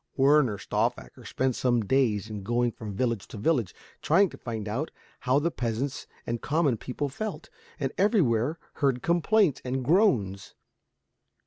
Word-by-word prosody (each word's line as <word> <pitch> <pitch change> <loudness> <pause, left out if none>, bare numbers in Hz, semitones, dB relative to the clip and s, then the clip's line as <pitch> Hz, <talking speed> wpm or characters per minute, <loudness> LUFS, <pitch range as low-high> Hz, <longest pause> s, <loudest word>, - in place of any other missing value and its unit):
Werner 135 -5 +4
Stauffacher 115 +5 -2
spent 130 -2 -1
some 120 -4 +1
days 110 -4 +1
in 105 -2 -6
going 120 +4 0
from 105 -3 -8
village 115 -3 -1
to - - -9
village, 120 - 0 0.3
trying 190 +5 +4
to - - -11
find 110 -3 -5
out 130 +10 -2 0.3
how 130 +1 +2
the 165 +4 +1
peasants 125 +4 -3 0.2
and 115 0 -3
common 150 -4 +1
people 130 +6 -3
felt, 210 +9 -6 0.3
and 135 -3 -1
everywhere 155 - +2 0.2
heard 135 -4 +1
complaints 175 0 +2
and 130 0 -2
groans. 120 - +2
125 Hz, 145 wpm, -27 LUFS, 115-150 Hz, 0.3 s, Werner